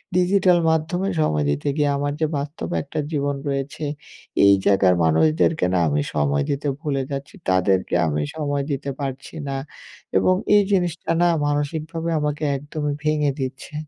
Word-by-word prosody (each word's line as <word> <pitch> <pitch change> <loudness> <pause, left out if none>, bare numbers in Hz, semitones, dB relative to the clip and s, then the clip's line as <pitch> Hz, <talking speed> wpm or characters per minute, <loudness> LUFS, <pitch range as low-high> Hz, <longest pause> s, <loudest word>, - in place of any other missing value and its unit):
Digital 180 0 +4
মাধ্যমে 165 +4 0
সময় 75 - +1
দিতে 75 - -2
গিয়ে, 145 -1 +2
আমার 145 0 -1
যে - - +4
বাস্তব 145 +3 -5
একটা 145 - -5
জীবন 145 -2 0
রয়েছে, 140 +2 -3 0.6
এই 100 - +8
জায়গার 95 -2 +4
মানুষদেরকে 155 - +3
না 90 - +3
আমি 75 0 +1
সময় 70 -1 +1
দিতে 140 +1 -1
ভুলে 140 -4 -1
যাচ্ছি। 140 0 -5
তাদেরকে 95 0 +2
আমি 75 -1 -1
সময় 145 -2 -1
দিতে 140 0 -3
পারছি 135 +1 -5
না 135 - -2 0.6
এবং 185 - +3 0.2
এই 205 - +7
জিনিসটা 175 -4 0
না 175 - +5 0.2
মানসিকভাবে 155 +3 -2
আমাকে 150 +1 -2
একদমই 145 +1 -3
ভেঙে 150 -2 +2
দিচ্ছে। 130 +2 -5
145 Hz, 150 wpm, -22 LUFS, 130-155 Hz, 0.6 s, এই